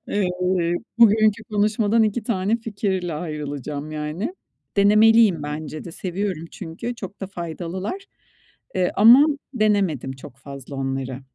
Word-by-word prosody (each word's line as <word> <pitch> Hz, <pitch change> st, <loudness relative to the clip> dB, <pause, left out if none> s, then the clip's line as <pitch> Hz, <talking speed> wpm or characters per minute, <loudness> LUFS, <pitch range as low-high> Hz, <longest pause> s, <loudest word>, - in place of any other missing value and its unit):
Iıı, 180 Hz, -3 st, 0 dB, 0.2 s
bugünkü 215 Hz, -1 st, +5 dB
konuşmadan 215 Hz, +1 st, +2 dB
2 215 Hz, +2 st, 0 dB
tane 210 Hz, 0 st, 0 dB
fikirle 195 Hz, -6 st, -3 dB
ayrılacağım 150 Hz, -2 st, -5 dB
yani; 155 Hz, -, -4 dB, 0.4 s
denemeliyim 210 Hz, -3 st, +5 dB
bence 150 Hz, +1 st, -5 dB
de. 170 Hz, -, -8 dB
Seviyorum 185 Hz, -2 st, -3 dB
çünkü 195 Hz, +7 st, -6 dB
çok 195 Hz, -3 st, -9 dB
da 195 Hz, -, -3 dB
faydalılar, 185 Hz, -, -5 dB, 0.7 s
eee, 180 Hz, -1 st, +1 dB
ama 240 Hz, +8 st, +8 dB, 0.3 s
denemedim 200 Hz, -, +1 dB
çok 130 Hz, -1 st, -12 dB
fazla 140 Hz, 0 st, -10 dB
onları. 135 Hz, -1 st, -3 dB
185 Hz, 115 wpm, -22 LUFS, 155-215 Hz, 0.7 s, ama